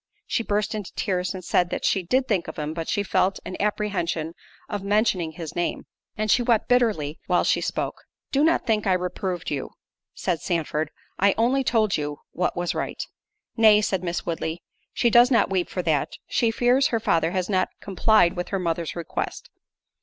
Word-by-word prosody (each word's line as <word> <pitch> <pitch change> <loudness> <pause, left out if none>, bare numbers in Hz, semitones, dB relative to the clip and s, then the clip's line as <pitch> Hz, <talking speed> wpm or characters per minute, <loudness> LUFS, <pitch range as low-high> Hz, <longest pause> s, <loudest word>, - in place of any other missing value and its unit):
She - - 0
burst 210 -1 -1
into 210 -4 -5
tears, 185 -2 -1
and 185 -2 -8
said 175 +1 +2
that - - -3
she 195 - +2
"Did 255 +9 +1
think 195 -7 0
of - - -7
him, 150 0 -3
but 165 0 -4
she 205 - +1
felt 190 -1 +1
an 185 - -5
apprehension 185 -6 -1 0.3
of 205 -2 -4
mentioning 200 -5 +1
his 160 -1 -7
name"—and 210 +4 -3
she 250 - +4
wept 235 -3 +2
bitterly 215 -12 +1
while 180 -1 +3
she - - +2
spoke. - - -3 0.3
"Do 280 +1 +3
not 330 -2 +3
think 215 -3 +1
I 190 - +4
reproved 180 -1 -2
you," 140 -3 -3 0.5
said 170 -4 -1
Sandford; 160 -3 -1 0.3
"I 200 +1 +4
only 255 +4 +2
told 220 -5 +2
you 145 -1 -3
what 180 0 -1
was 175 0 -1
right." - - -3 0.5
"Nay," 220 -2 +6
said 190 -3 -1
Miss 175 -1 -3
Woodley, 165 0 -3 0.3
"she 235 - +2
does 240 +2 +7
not 235 -6 +3
weep 185 -2 0
for 180 - -3
that—she 160 - 0
fears 245 +4 +3
her 230 - 0
father 165 -6 +2
has 180 0 -1
not 185 -2 +1
complied 195 -2 +3
with 180 0 -3
her 195 - -1
mother's 170 -2 -2
request. 170 -2 -5
190 Hz, 185 wpm, -24 LUFS, 170-215 Hz, 0.5 s, does